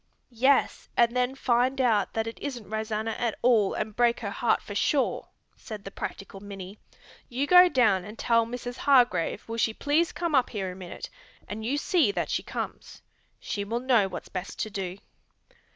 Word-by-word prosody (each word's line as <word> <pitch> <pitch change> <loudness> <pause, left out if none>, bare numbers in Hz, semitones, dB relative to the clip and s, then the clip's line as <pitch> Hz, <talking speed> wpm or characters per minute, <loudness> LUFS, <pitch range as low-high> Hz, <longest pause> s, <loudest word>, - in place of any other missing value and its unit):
"Yes, 260 +4 +2
and 235 0 +4
then 250 +1 +1
find 255 +1 +1
out 225 -6 +2
that 225 0 -1
it 225 - -7
isn't 250 -7 -6
Rosanna 220 +1 -2
at 235 -3 -1
all 225 -5 +4
and 215 -1 -3
break 240 0 +3
her 200 -3 -3
heart 230 +3 +1
for 205 - -9
sure," 265 +6 0 0.3
said 215 -3 -9
the 195 - -6
practical 195 0 -7
Minnie. 195 0 -9 0.5
"You 260 +3 -1
go 360 +3 +8
down 220 - +3
and 210 +4 -10
tell 230 -1 +2
Mrs. 245 +1 -6
Hargrave 250 -11 +2
will 230 0 -4
she 220 -1 +1
please 310 +4 +1
come 340 -2 -3
up 260 -3 +3
here 195 -4 -3
a - - -9
minute, 185 -2 -8 0.4
and 210 +2 -6
you 260 +6 0
see 300 - +2
that - - -2
she - - 0
comes. - - -7 0.4
She 205 - -3
will 230 +4 -2
know 240 -6 +3
what's - - -7
best 185 0 -6
to 215 - -3
do." 190 -2 -4
230 Hz, 185 wpm, -27 LUFS, 205-250 Hz, 0.5 s, go